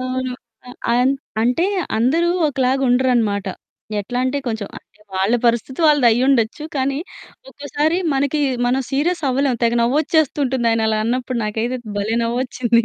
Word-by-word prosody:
అవును. 255 0 -3 0.3
ఆ! - - -11 0.2
అన్ 250 +3 +3 0.3
అంటే 250 +9 +2 0.3
అందరూ 315 +9 +2 0.2
ఒకలాగుండరనమాట. 250 -6 +1 0.5
ఎట్లంటే 255 +6 -1
కొంచెం, 220 -4 -3 0.5
వాళ్ళ 195 +5 +1
పరిస్థితి 235 +5 0
వాళ్ళదయ్యుండొచ్చు. 255 -2 +3
కానీ 270 +1 0 0.5
ఒక్కోసారి 290 +4 -1 0.2
మనకి 280 +2 0 0.3
మనం 255 +2 +1
సీరియస్ 325 +5 0
అవ్వలేం. 265 -1 +1
తెగ 235 0 +3
నవ్వొచ్చేస్తుంటుంది 270 -2 +1
ఆయనలా 220 -1 +1
అన్నప్పుడు 250 +1 -1
నాకైతే 225 +4 -2 0.2
భలే! 205 +2 -1
నవ్వొచ్చింది. 235 -1 +1
255 Hz, 110 wpm, -20 LUFS, 235-275 Hz, 0.5 s, అన్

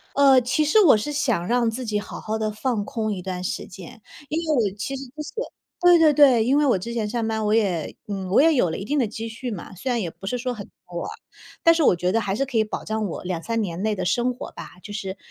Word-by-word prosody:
呃， 275 -2 +6
其 300 +6 +1
实 430 +9 +5
我 315 - +7
是 295 +8 -3
想 235 -11 0
让 240 -1 +2
自 250 +3 -4
己 210 -2 -1
好 205 - -7
好 220 +1 -3
地 215 0 -1
放 215 0 -2
空 220 -5 -2
一 185 - -4
段 180 0 -5
时 - - -3
间。 185 +3 -11 0.3
因 310 - -1
为 305 - +3 0.2
我 200 - -14
其 270 +7 -3
实 270 - -7
就 290 +5 -12
是 - - -9 0.5
对 355 -1 +7
对 315 -2 +6
对， 265 -6 +6
因 265 +4 +3
为 295 - +3
我 245 -9 +3
之 235 +6 -6
前 215 -3 -1
上 230 0 -2
班 220 -1 -1
我 210 - +1
也 190 -8 0
嗯， 195 -2 -4
我 205 - +5
也 320 +1 +5
有 185 -10 +2
了 - - -4
一 195 - -5
定 290 +7 -1
的 245 -6 +2
积 225 +2 -6
蓄 235 +3 -6
嘛， 195 -2 -7
虽 255 +8 -4
然 240 - +1
也 180 - -2
不 - - -17
是 250 - -2
说 250 0 -2
很 200 -3 -8 0.2
多， 175 -1 -5 0.6
但 330 0 +7
是 330 - +1
我 180 - +5
觉 180 +2 0
得 225 - +2
还 200 -1 -2
是 275 - 0
可 245 -3 -5
以 220 - +5
保 215 - -5
障 220 0 -2
我 170 - -6
2-3 185 +6 -2
年 180 -2 -3
内 215 -1 0
的 185 - -2
生 245 +6 +1
活 250 - -8
吧。 - - -9
就 205 - -8
是， 195 -2 -5
225 Hz, 300 characters per minute, -23 LUFS, 200-260 Hz, 0.6 s, 我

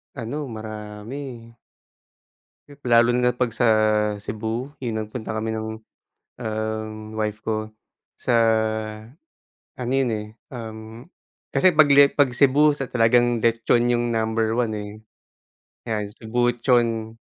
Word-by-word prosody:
Ano 140 +4 -4
marami. 110 +3 -8 1.3
Lalo 120 0 +5
na 125 0 +2
pag 125 -2 0
sa 115 +1 +1 0.6
Cebu, 110 +6 -4
yung 110 -4 -2
nagpunta 110 0 -6
kami 110 +1 -2
ng, 110 0 -3 0.8
um, 110 0 -3 0.2
wife 105 -1 -2
ko 110 0 -3 0.5
sa 120 - +1 1.4
ano 125 0 -4
yun, 135 -3 +2
eh, 105 0 -5 0.2
um, 110 -1 -9 0.5
kasi 185 -3 +4
pag 150 -2 +6
le 140 0 +8
pag 140 -2 +2
Cebu 140 +4 +4
sa 140 -2 -4
talagang 120 0 +3
letchon 120 +1 +2
yung 120 -1 0
number 110 0 0
one, 120 -2 0
eh. 105 0 -6 1.0
'Yan 105 -2 -1
Cebuchon, 115 -1 0
115 Hz, 115 wpm, -23 LUFS, 110-125 Hz, 1.4 s, le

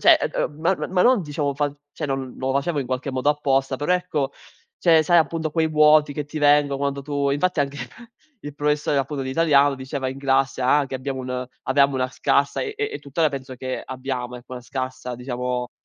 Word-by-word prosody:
cioè, - - +7 0.2
ehm, - - -1
m - - -14 0.2
ma - - -3
ma 185 -1 +2
non 250 -4 +5
diciamo 145 -2 -2
fa 145 0 -1 0.2
cioè - - -4
non 135 -2 -3
lo 130 0 -1
facevo 145 +3 0
in 130 - -4
qualche 130 +2 -3
modo 130 +2 0
apposta, 135 -2 +1
però, 145 +6 0
ecco, 150 -6 -1 0.5
cioè, 165 -3 +5
sai, 175 +3 +5
appunto, 160 0 0
quei 160 +1 +1
vuoti 150 -1 +5
che 150 -1 -3
ti 155 +1 -6
vengo 145 -1 +4
quando 140 0 -2
tu 140 -1 -1
infatti 155 +3 +1
anche 140 0 -1 0.7
il 145 -1 -6
professore, 150 0 +1
appunto, 135 +1 -2
di 130 - -4
italiano 145 -2 +4
diceva 130 0 -4
in 135 +1 -6
classe, 135 -1 +1
ah, 140 +3 +3
che 135 - -7
abbiamo 130 0 -4
un 125 0 -4 0.2
avevamo 140 +1 +3
una 130 -1 0
scarsa 140 +2 +1
e 425 - -3
e 425 0 -2
e, - - -4
tuttora, 155 +3 0
penso 130 -1 -6
che 130 +1 -4
abbiamo, 130 -1 -5
ecco, 125 +1 -13
una 125 - -6
scarsa, 130 -1 -5
diciamo, 125 0 -3
140 Hz, 210 wpm, -23 LUFS, 130-150 Hz, 0.7 s, cioè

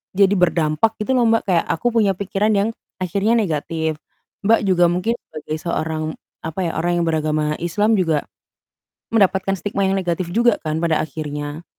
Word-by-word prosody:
jadi, 200 0 +5
berdampak, 170 +4 +2
gitu, 265 - -2
loh, 235 -2 +3
Mbak, 225 0 +3
kayak 170 - +2
aku 205 +9 -1
punya 210 -5 +2
pikiran 200 +2 0
yang 200 +2 +2 0.3
akhirnya 200 +6 +1
negatif. 160 -5 -1 0.5
Mbak 225 +1 +5
juga 180 -3 +4
mungkin 185 +7 0
sebagai 155 0 -5
seorang, 160 -2 -2 0.4
apa 160 +4 -6
ya, 165 - -1
orang 175 0 +1
yang - - 0
beragama 155 -1 0
islam 205 +5 +1
juga, 160 -5 +1 0.9
mendapatkan 195 -3 +2
stigma 200 +2 -3
yang 195 - +1
negatif 175 -1 -2
juga, 235 +3 +2
kan, 155 0 -2
pada 165 -1 +1
akhirnya. 150 +1 -5
175 Hz, 165 wpm, -20 LUFS, 160-200 Hz, 0.9 s, jadi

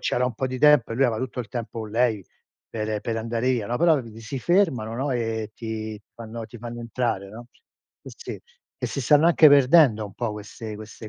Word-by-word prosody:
c'era 125 - 0
un 125 - -4
po' 130 - -2
di 130 0 -5
tempo 150 -6 +5
e - - -3
lui 135 - +3
aveva 115 -4 +1
tutto 130 0 -4
il 115 - -7
tempo, 115 -2 -5
o 110 - -4
lei, 110 -2 0 0.4
per 110 -1 -3
per 115 +1 -3
andare 115 +2 -1
via, 120 -5 -1
no. 120 - -1
Però 165 -4 +4
vedi 115 -2 -11
si 115 +4 -5
fermano, 130 - +1
no, 135 +3 -2
e 115 -2 -2
ti 110 -2 -6
fanno 115 0 -8
ti 120 +1 -12
fanno 120 +1 -7
entrare, 115 -4 -2
no. 120 +3 -10 0.6
Sì - - -10
sì, - - -8 0.4
e - - -2
si 140 - -4
stanno 145 +5 +4
anche 160 -2 +7
perdendo 140 -5 +5
un 100 -1 -10
po' 115 -3 -3
queste 105 +1 -8
queste 110 +1 -10
115 Hz, 220 wpm, -24 LUFS, 110-130 Hz, 0.6 s, anche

